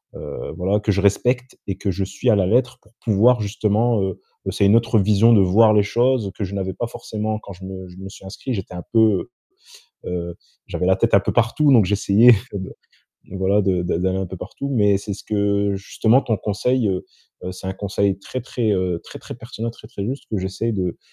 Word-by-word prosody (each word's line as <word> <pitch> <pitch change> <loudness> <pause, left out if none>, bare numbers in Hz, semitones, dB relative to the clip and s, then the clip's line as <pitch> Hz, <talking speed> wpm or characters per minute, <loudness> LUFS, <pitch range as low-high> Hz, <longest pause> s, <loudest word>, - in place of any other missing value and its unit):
heu, - - -7
voilà 95 +4 +1
que 105 0 0
je 100 - 0
respecte 125 +6 +1
et 95 - -2
que 100 - -2
je 95 +2 -2
suis 95 +6 -2
à 110 - +5
la 95 - +2
lettre 125 +4 +1
pour 105 - -26
pouvoir 115 +2 +4
justement 105 +2 +1
heu 95 - -3 0.3
heu, - - 0
c'est 100 - +1
une 100 +3 +5
autre 115 -1 +2
vision 105 +3 +4
de 105 - +6
voir 110 +4 +5
les 105 -1 +4
choses 120 0 +1
que 100 - -2
je 95 - -8
n'avais 95 -1 -3
pas 120 - -3
forcément. 110 -2 -4
Quand 100 - -11
je 95 +1 -11
me 95 -1 -8
je 90 - -14
me 95 +1 -8
suis 95 - -13
inscrit, 110 +6 -5
j'étais 95 -4 -5
un 90 - -6
peu, 115 - +4
heu 110 -1 +3 0.8
heu, 85 -1 -4 0.3
j'avais 90 - -2
la 95 0 +4
tête - - +1
un 100 - +7
peu - - -2
partout, 120 +6 +2
donc 115 -5 +6
j'essayais 105 +4 +5 0.2
de, 95 -1 -5 0.6
voilà 95 +2 +1
de 95 -2 +1
de 90 - -1
d'aller 95 +1 0
un 95 - -2
peu 95 - -8
partout, 140 +9 -6
mais 105 -5 +3
c'est 100 0 -5
ce - - -12
que 100 -1 0
justement 110 +5 +2
ton 110 - 0
conseil, 110 +5 0
heu, 95 -1 -2 0.5
c'est 90 +1 -9
un - - -2
conseil 100 -1 -1
très, 130 +6 -6
très, 115 -3 -1
heu, 90 -3 -1
très, - - -10
très - - -8
pertinent, 115 -1 -6
très, - - -15
très 100 - -6
juste 135 +3 -4
que 110 - -1
j'essaie 95 +5 -2
de 90 -4 -2
100 Hz, 230 wpm, -21 LUFS, 95-115 Hz, 0.8 s, un